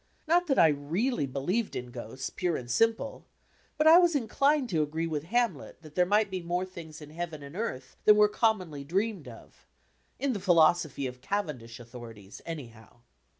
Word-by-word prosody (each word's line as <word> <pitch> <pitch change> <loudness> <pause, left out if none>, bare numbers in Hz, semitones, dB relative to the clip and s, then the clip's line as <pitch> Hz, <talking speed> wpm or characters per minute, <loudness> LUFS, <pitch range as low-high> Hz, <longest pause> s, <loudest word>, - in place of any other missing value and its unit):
Not 350 +2 +3
that 270 - +1
I 160 - +7
really 150 - -1
believed 175 - -2
in 125 0 -5
ghosts, 120 +3 -6
pure 180 -3 -1
and 120 -1 -7
simple; 225 - 0 0.5
but 305 - +2
I 325 +2 +9
was 350 -3 +3
inclined 280 +2 +2
to 165 -5 +1
agree 160 +2 -2
with 155 -2 -3
Hamlet 235 -3 -1
that 155 -1 -13
there 180 +1 +2
might 205 +1 +2
be 185 -1 -3
more 175 +2 -2
things 165 -4 -10
in 150 - -12
heaven 160 -2 -6
and 140 +3 -10
earth 135 - -5
than 210 - +8
were 210 0 +6
commonly 190 -10 0
dreamed 190 - -2
of 115 -2 -14 0.5
in 270 0 0
the 205 - -3
philosophy 165 -5 +3
of 125 -1 -6
Cavendish 130 - -4
authorities, 115 -4 -11
anyhow. 120 -7 -9
170 Hz, 180 wpm, -29 LUFS, 140-215 Hz, 0.5 s, I